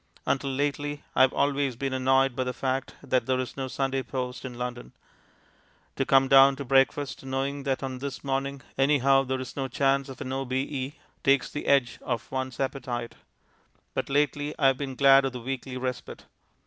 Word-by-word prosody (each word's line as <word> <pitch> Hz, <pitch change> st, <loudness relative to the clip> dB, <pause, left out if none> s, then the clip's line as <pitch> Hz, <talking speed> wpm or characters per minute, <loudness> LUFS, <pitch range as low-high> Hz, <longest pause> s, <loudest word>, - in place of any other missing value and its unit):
Until 140 Hz, 0 st, 0 dB
lately, 145 Hz, +1 st, -2 dB
I -, -, +4 dB
have 130 Hz, 0 st, +6 dB
always 140 Hz, -2 st, 0 dB
been 135 Hz, +2 st, -3 dB
annoyed 130 Hz, 0 st, +2 dB
by 130 Hz, -, 0 dB
the 125 Hz, 0 st, -3 dB
fact 135 Hz, 0 st, -2 dB
that 130 Hz, 0 st, 0 dB
there 130 Hz, -1 st, +1 dB
is 130 Hz, -, -4 dB
no 135 Hz, -1 st, -3 dB
Sunday 135 Hz, 0 st, -1 dB
post 125 Hz, -1 st, -5 dB
in 130 Hz, -2 st, -6 dB
London. 125 Hz, 0 st, -5 dB, 1.0 s
To 135 Hz, -, -1 dB
come 135 Hz, 0 st, +5 dB
down 135 Hz, 0 st, +7 dB
to 140 Hz, +1 st, -6 dB
breakfast 135 Hz, +1 st, +2 dB
knowing 135 Hz, +2 st, -2 dB
that 135 Hz, 0 st, -1 dB
on 130 Hz, -1 st, -4 dB
this 140 Hz, -1 st, -6 dB
morning 135 Hz, -1 st, -2 dB, 0.2 s
anyhow 135 Hz, -1 st, +4 dB
there 130 Hz, 0 st, -2 dB
is 130 Hz, -1 st, -7 dB
no 135 Hz, -1 st, -2 dB
chance 135 Hz, +2 st, +1 dB
of 130 Hz, -, -9 dB
an 130 Hz, -, -4 dB
O.B.E. 135 Hz, +1 st, -2 dB, 0.3 s
takes 135 Hz, -1 st, +3 dB
the 145 Hz, -, -5 dB
edge 135 Hz, -3 st, +2 dB
off 120 Hz, -3 st, -3 dB
one's 130 Hz, -1 st, -3 dB
appetite. 125 Hz, -3 st, -3 dB, 0.8 s
But -, -, -2 dB
lately, 145 Hz, +1 st, 0 dB
I 140 Hz, -, +1 dB
have 135 Hz, -1 st, +5 dB
been 135 Hz, -2 st, -4 dB
glad 135 Hz, +1 st, +6 dB
of 135 Hz, -1 st, -2 dB
the 125 Hz, -, -5 dB
weekly 130 Hz, +1 st, -5 dB
respite. 130 Hz, 0 st, -5 dB
135 Hz, 185 wpm, -27 LUFS, 130-140 Hz, 1.0 s, down